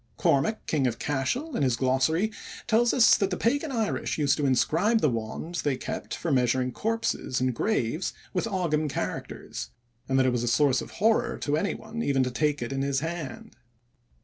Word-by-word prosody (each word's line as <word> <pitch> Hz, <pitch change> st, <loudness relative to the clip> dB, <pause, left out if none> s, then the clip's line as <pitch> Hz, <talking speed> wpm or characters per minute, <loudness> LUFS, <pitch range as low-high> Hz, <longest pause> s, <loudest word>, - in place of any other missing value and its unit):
Cormac, 215 Hz, +11 st, +1 dB
king 140 Hz, -5 st, +1 dB
of 115 Hz, -2 st, -2 dB
Cashel, 190 Hz, -, -2 dB
in -, -, -1 dB
his 130 Hz, -4 st, +2 dB
glossary 135 Hz, -, +1 dB, 0.3 s
tells 235 Hz, +1 st, +3 dB
us 235 Hz, -3 st, +6 dB
that 195 Hz, -, 0 dB
the 180 Hz, -, -2 dB
pagan 285 Hz, +6 st, 0 dB
Irish 225 Hz, -5 st, -1 dB
used 145 Hz, -2 st, +3 dB
to 145 Hz, -2 st, +1 dB
inscribe 170 Hz, -, +2 dB
the 150 Hz, -, +2 dB
wand 115 Hz, +10 st, -4 dB
they 140 Hz, -3 st, 0 dB
kept -, -, -5 dB
for 170 Hz, -, -3 dB
measuring 125 Hz, -1 st, +2 dB
corpses 225 Hz, -, -1 dB
and 130 Hz, 0 st, +1 dB
graves 160 Hz, -, -1 dB, 0.2 s
with 185 Hz, +4 st, 0 dB
Ogam 165 Hz, -7 st, 0 dB
characters, -, -, -5 dB, 0.4 s
and 130 Hz, -, +2 dB
that 130 Hz, -, +4 dB
it 130 Hz, -, +3 dB
was 120 Hz, -1 st, 0 dB
a 120 Hz, -, -2 dB
source 130 Hz, +2 st, +3 dB
of -, -, -8 dB, 0.2 s
horror 225 Hz, -1 st, +3 dB
to 145 Hz, -, 0 dB
anyone 220 Hz, +6 st, -3 dB
even 135 Hz, -8 st, +2 dB
to 125 Hz, -, -2 dB
take 150 Hz, +1 st, 0 dB
it 120 Hz, -, -4 dB
in 135 Hz, -, -1 dB
his 140 Hz, -1 st, 0 dB
hand. 175 Hz, +8 st, -6 dB
150 Hz, 190 wpm, -27 LUFS, 130-220 Hz, 0.4 s, us